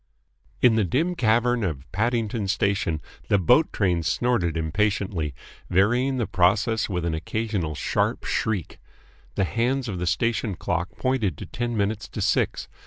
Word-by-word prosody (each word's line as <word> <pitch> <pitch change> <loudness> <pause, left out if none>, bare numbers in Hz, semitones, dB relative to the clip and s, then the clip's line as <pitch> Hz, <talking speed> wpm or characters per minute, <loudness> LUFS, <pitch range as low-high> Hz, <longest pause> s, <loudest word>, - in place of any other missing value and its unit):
In 125 -2 +7
the 110 -1 +3
dim 150 - +1
cavern 120 -3 +2
of 75 -8 -3
Paddington 110 0 0
Station 100 -5 0 0.3
the 100 - +4
boat 125 - +4
train 90 -4 +1
snorted 85 -1 0
impatiently, 85 - -1 0.3
varying 120 +8 +2
the 120 - 0
process 105 +4 +2
with 90 -3 -2
an 85 - 0
occasional 90 -1 -2
sharp - - 0
shriek. 100 -8 -2 0.6
The - - +1
hands 120 - 0
of 95 -5 -4
the 90 - -2
station 110 +2 0
clock 90 +1 -2
pointed 130 -7 0
to - - -7
ten 120 -1 -3
minutes 105 +1 -1
to - - -7
six. - - 0
105 Hz, 150 wpm, -25 LUFS, 90-120 Hz, 0.6 s, In